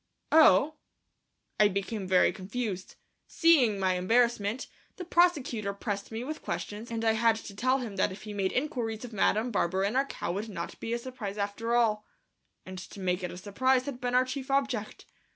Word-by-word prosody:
"Oh!..." 305 -1 +6 0.8
I 210 - +7
became 200 0 -3
very 185 -1 +4
confused. 195 -1 -5 0.3
Seeing 265 - +4
my 190 -1 +2
embarrassment, 225 +3 +1 0.3
the 365 - -7
prosecutor 285 - +2
pressed 200 0 -4
me 225 +2 -4
with 310 +4 -5
questions, 210 +3 -5
and 230 -1 -3
I 225 - +5
had 225 0 +3
to 215 -2 -9
tell 255 +5 +2
him 230 -6 -6
that 190 - +2
if 190 - -10
he 210 -1 -7
made 195 -2 0
inquiries 245 -5 -2
of 235 - -10
Madame 215 +3 +1
Barberin 195 +2 0
our 270 +1 +2
cow - - -4
would 205 +5 -4
not 170 -4 -6
be 225 - -5
a - - +1
surprise 235 -5 -6
after 210 +3 -1
all, 215 -3 +2 0.6
and 185 0 -7
to 195 +2 -10
make 180 0 -1
it 180 - -2
a 180 - -8
surprise 255 +7 +1
had 265 -4 -6
been 245 0 -1
our 255 +1 +5
chief 265 +1 -5
object. 270 -6 -1
220 Hz, 190 wpm, -29 LUFS, 200-250 Hz, 0.8 s, I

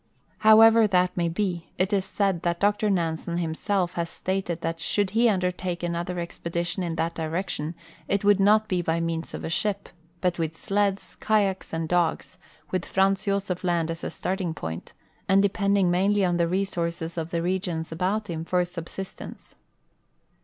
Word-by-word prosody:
However 220 +1 +7
that 180 -2 +2
may 170 -1 +1
be, 175 -1 -2
it 190 +3 +1
is 195 -2 +2
said 195 -3 0
that 170 0 -1
Dr 205 +1 +2
Nansen 170 -2 -1
himself 175 +2 -1
has 170 -1 -2
stated 185 -3 -3
that 165 0 -2
should 200 +3 0
he 230 +3 +4
undertake 180 -2 -1
another 175 +1 -2
expedition 170 +1 -3
in 170 -2 -2
that 165 +1 -1
direction 160 -1 -3 0.3
it 200 +1 0
would 205 -1 +5
not 215 +2 +4
be 185 -3 0
by 165 -1 0
means 165 0 -3
of - - -7
a - - -3
ship, 200 +2 -1 0.3
but 180 -1 0
with 160 -1 -2
sleds, 200 +2 -1
kayaks, 200 -3 +1
and 165 0 -2
dogs, 175 +1 0 0.3
with 185 -2 0
Franz 195 +1 +1
Josef 195 -3 -1
land 170 -2 +1
as 165 - -6
a - - -2
starting 185 -3 -3
point, 80 - -6 0.4
and 195 0 +6
depending 200 -2 +2
mainl}^ 195 +2 +3
on 175 -1 +1
the 170 -1 +2
re 190 +3 +1
sources 170 -2 -3
of 165 -1 -3
the 170 -1 -1
regions 175 -3 -2
about 190 +6 -1
him 165 -2 -4
for 180 +1 +1
subsistence. 180 +2 -8
180 Hz, 175 wpm, -26 LUFS, 170-195 Hz, 0.4 s, However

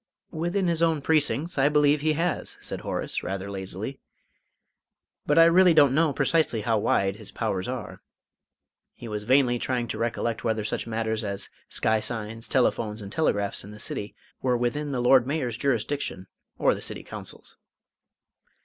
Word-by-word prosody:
"Within 175 +4 -1
his 165 -1 0
own 165 -2 +3
precincts, 155 0 +1
I 140 +2 +5
believe 150 0 +3
he 155 +1 +2
has," 170 +3 -2
said - - -6
Horace, - - -3
rather 95 +1 -4
lazily, 95 +7 -6 1.3
"but 150 - +3
I 165 - +9
really 175 0 +6
don't 145 -4 +6
know 155 +1 +3
precisely 145 -5 +1
how 110 0 +1
wide 100 -1 +1
his 110 -2 -10
powers 95 -5 -2
are." 125 -5 -6 0.9
He 120 - -9
was 105 -1 -4
vainly 125 -1 +3
trying 125 -1 -1
to - - -4
recollect 115 0 -2
whether 110 -2 0
such 105 - -3
matters 110 0 -1
as 100 -2 -2 0.2
sky 110 0 +1
signs, 115 +1 -4
telephones, 110 -5 0
and 100 - -8
telegraphs 100 -10 0
in 100 - -11
the 105 - -10
City 105 0 -3 0.3
were 125 -2 +2
within 145 +5 -1
the 125 -3 -1
Lord 125 0 +5
Mayor's 135 -6 -1
jurisdiction 120 -5 -1 0.3
or - - +3
the - - -6
County - - -4
Council's. - - -9
120 Hz, 165 wpm, -26 LUFS, 110-150 Hz, 1.3 s, I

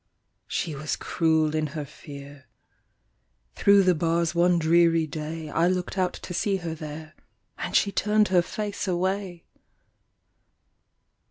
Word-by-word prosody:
She 165 - -2
was 150 +2 -3
cruel 160 -2 +1
in 155 -1 0
her 150 - -3
fear; 140 0 -12 1.1
Through 200 - +5
the 185 -1 +4
bars 170 +1 0
one 175 +1 +3
dreary 165 0 +3
day, 155 +1 -6
I 165 +3 +2
looked 180 0 -1
out 185 -2 0
to 180 - -8
see 195 +3 0
her 170 -4 -4
there, 155 0 -8 0.5
And - - -4
she 200 - +3
turned 210 +1 +2
her 180 -2 +4
face 205 +3 -4
away! 185 0 -2
170 Hz, 135 wpm, -26 LUFS, 155-185 Hz, 1.1 s, Through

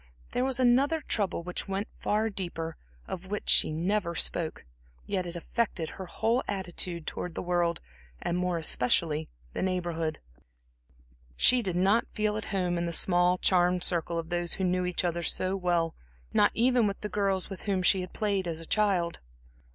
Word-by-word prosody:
There 250 - 0
was 260 -1 0
another 265 +6 +4
trouble 200 -9 0
which 180 +3 -4
went 195 +2 -2
far 215 +1 +1
deeper 165 -4 -4 0.3
of 185 +1 -6
which 210 +1 -4
she - - +6
never 170 +2 0
spoke; 165 - -1 0.4
yet 185 -3 -1
it 170 - -6
affected 170 -3 -2
her 190 - -8
whole 230 +7 +1
attitude 175 -3 -3
towards 180 -2 -5
the - - -3
world, 175 -1 +1 0.4
and 170 - -2
more 180 -1 0
especially 155 +1 +1 0.2
the - - -3
Neighborhood. 170 -4 -1 1.2
She 250 -1 +6
did 185 -6 -2
not 195 +6 +3
feel 215 -1 0
at 215 - -3
home 180 -3 0
in 170 - -1
the 170 - -3
small, 180 +1 +3
charmed 180 -1 +3
circle 170 -1 0
of 165 0 -4
those 175 -1 -1
who 190 - -1
knew 180 0 +1
each 180 0 -1
other 170 0 0
so 185 +3 0
well, 175 -3 +1 0.4
not - - +5
even 245 -1 +4
with 200 - -4
the 210 - -2
girls 195 -2 -1
with 195 - -6
whom 190 -2 +1
she 190 +1 +4
had 180 - -7
played 200 -4 -1
as 165 -1 -3
a 165 - -7
child. 190 -4 +1
180 Hz, 180 wpm, -29 LUFS, 170-200 Hz, 1.2 s, she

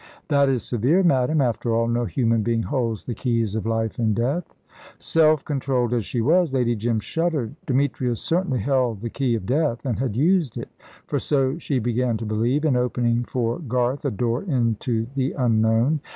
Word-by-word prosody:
"That 140 -2 +3
is 125 -5 0
severe, 130 - +1
madame. 145 -2 +2
After 120 -2 0
all, 115 0 +1
no 120 +1 0
human 115 +2 +1
being 115 +1 0
holds 115 -6 -2
the 120 - -3
keys 115 -3 -1
of 110 0 -3
life 115 0 -1
and 110 -3 +1
death." 135 +10 -1 0.5
Self 155 -3 +2
controlled 130 -4 -1
as 115 -4 0
she 120 - -2
was, 165 +5 +3
Lady 120 -3 +1
Jim 115 +1 -1
shuddered. 155 -1 -2
Demetrius 130 -3 0
certainly 165 - 0
held 125 -5 0
the 115 -1 -4
key 130 -4 0
of 105 -5 -4
death, 135 0 0
and 120 -5 -1
had 125 -5 -2
used 165 - +2
it - - -6 0.4
for - - -1
so 135 +1 0
she 145 -4 -1
began 120 0 0
to 115 - -6
believe 120 +8 0
in 145 -5 +3
opening 120 -1 0
for 120 +1 -2
Garth 125 -2 -1
a 140 - +1
door 120 +2 -1
into 120 - -1
the 135 0 -1
unknown. 115 +3 +2
125 Hz, 185 wpm, -23 LUFS, 115-140 Hz, 0.5 s, That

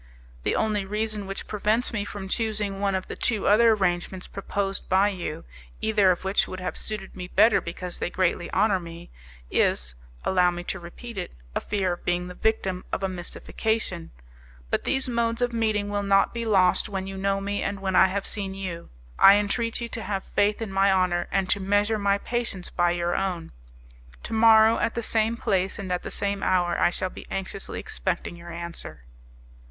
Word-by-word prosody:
"The - - 0
only 210 -2 +1
reason 210 0 -2
which 195 - -5
prevents 215 +4 0
me 205 -3 -1
from 200 -1 -6
choosing 210 -2 0
one 200 -1 +1
of 185 - -2
the - - -7
two 220 -4 0
other 225 +2 +6
arrangements 185 -2 -1
proposed 195 0 -3
by 190 +2 +4
you, 175 -6 -5 0.3
either 210 -3 +3
of 180 0 +1
which 190 +1 +2
would 185 - -6
have 180 - -4
suited 210 -3 -6
me 180 -1 -6
better 210 +3 +4
because 175 +1 -6
they - - -1
greatly 180 -1 0
honour 200 -1 +3
me, 170 0 -10 0.4
is, - - +1 0.3
allow 180 -1 +4
me 175 0 -4
to - - -4
repeat 195 +6 -8
it, 180 - -6 0.2
a - - -1
fear 190 -3 0
of 175 - -9
being 175 0 0
the 180 - -7
victim 190 -3 0
of - - -2
a - - +2
mystification; 185 +1 -3 0.6
but - - 0
these 265 -1 +1
modes 235 -1 0
of 245 -1 0
meeting 215 -3 +1
will 205 0 -1
not 195 0 +3
be 235 -1 -3
lost 190 -2 +3
when 190 -2 -3
you 195 0 -6
know 195 +1 0
me 200 +1 -2
and 200 - -2
when 190 -1 -1
I - - +7
have 195 +1 -2
seen 195 -2 -3
you. 180 -3 -6 0.3
I 195 - +9
entreat 225 +3 0
you 235 - -2
to 230 - -5
have 195 -1 -3
faith 210 +2 +1
in 210 - -5
my 195 +1 +4
honour, 180 -2 +2
and 195 -1 +1
to 205 - +2
measure 205 +3 +1
my 200 0 +2
patience 225 -5 -3
by 175 -1 +2
your 175 0 0
own. 180 -4 -2 0.7
Tomorrow, 220 0 +5
at 225 - 0
the 235 - -2
same 225 +1 +1
place 190 -3 0
and 195 -3 -5
at 180 - 0
the - - -6
same 200 -1 -2
hour, 175 -2 +2
I - - +5
shall 185 +1 -3
be - - -11
anxiously 195 0 -5
expecting - - -3
your 170 0 -10
answer." 170 - -7
195 Hz, 200 wpm, -26 LUFS, 180-215 Hz, 0.7 s, I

